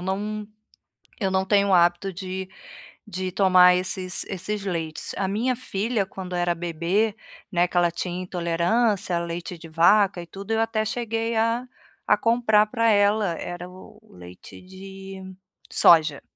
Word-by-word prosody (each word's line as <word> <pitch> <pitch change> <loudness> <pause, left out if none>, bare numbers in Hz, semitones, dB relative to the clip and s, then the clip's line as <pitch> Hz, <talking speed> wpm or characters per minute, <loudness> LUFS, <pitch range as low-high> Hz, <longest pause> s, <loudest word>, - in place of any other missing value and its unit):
não, 205 +3 -3 0.7
eu 190 -2 0
não 190 0 +1
tenho 200 0 +2
o 190 - +4
hábito 175 +2 +2
de 185 0 -6 0.6
de 185 -2 -4
tomar 185 -1 +6
esses 185 0 -2
esses 200 +2 -4
leites, 165 -4 -4
a 195 - -1
minha 235 +6 -1
filha 220 -2 -1
quando 185 -1 -8
era 175 0 +1
bebê, 175 +6 -1 0.3
né, 175 -2 +2
que 180 - -16
ela 175 -1 +3
tinha 175 +1 -4
intolerância, 180 +3 0
leite 170 +1 -5
de 165 0 -12
vaca 185 +3 +3
e 170 - -9
tudo 195 +4 -10
eu 225 0 +1
até 225 -1 0
cheguei 225 0 -2
a 230 +3 0 0.4
a - - +4
comprar 230 -2 +3
para 230 0 +1
ela, 205 -2 +3
era 175 0 -6
o 185 +3 -14
leite 90 0 -13
de 190 +1 -11 0.5
soja, 155 -4 +5
190 Hz, 150 wpm, -24 LUFS, 175-210 Hz, 0.7 s, tomar